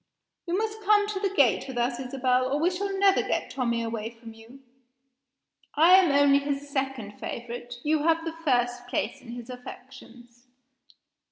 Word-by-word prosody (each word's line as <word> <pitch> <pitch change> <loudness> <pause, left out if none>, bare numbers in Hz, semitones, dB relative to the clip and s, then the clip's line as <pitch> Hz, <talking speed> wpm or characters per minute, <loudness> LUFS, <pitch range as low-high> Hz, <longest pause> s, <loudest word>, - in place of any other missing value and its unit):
You 345 +2 0
must 435 0 -3
come 415 0 +4
to 405 -2 -3
the 395 0 0
gate 280 - +2
with 260 -2 -7
us, 240 +1 0
Isabel, 255 0 0
or 285 - +1
we 340 +4 +2
shall 390 +2 -3
never 390 0 +4
get - - -2
Tommie 235 -3 -1
away 225 -1 -4
from 230 -1 -13
you; 230 +5 -16 1.1
I 325 +4 +6
am 375 -5 +6
only 280 0 +5
his 285 0 -3
second 265 -7 -3
favorite; 240 +1 -6
you 305 0 +1
have 325 +1 +1
the 330 - -3
first 245 -6 -1
place 210 -2 -3
in 235 - -10
his 240 -1 -8
affections. 245 -1 -12
265 Hz, 170 wpm, -26 LUFS, 240-330 Hz, 1.1 s, I